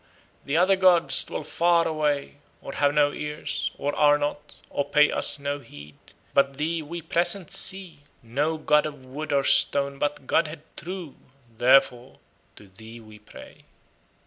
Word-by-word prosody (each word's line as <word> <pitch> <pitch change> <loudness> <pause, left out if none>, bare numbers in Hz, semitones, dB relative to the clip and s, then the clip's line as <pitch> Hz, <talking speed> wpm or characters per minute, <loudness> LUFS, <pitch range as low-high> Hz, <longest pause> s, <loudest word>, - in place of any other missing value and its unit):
The 145 +3 -1
other 185 +3 +4
gods 185 -3 +4
dwell - - -6
far 170 -1 +1
away, 150 -3 -2 0.2
Or 135 - -9
have 145 0 +1
no 145 0 +2
ears, 150 0 -4
Or 145 +1 -3
are 145 0 +4
not, 145 0 -5 0.2
or 145 - -1
pay 150 +1 +3
us - - +1
no 140 0 -4
heed. 75 - -14 0.4
But 140 -1 +2
thee 160 +3 -2
we 165 +2 -8
present 175 +1 +1
see, 190 -5 -3 0.2
No 145 +7 -2
god 150 0 +2
of 145 -3 -11
wood 145 +4 -7
or 140 -1 +2
stone, 140 0 +2
but 145 -2 -3
godhead 155 +1 -1
true. 175 -3 -7 0.4
Therefore 125 +1 +2 0.4
to 105 - -16
thee 110 +4 -13
we 110 -1 -15
pray." 105 - -15
145 Hz, 155 wpm, -25 LUFS, 140-160 Hz, 0.4 s, other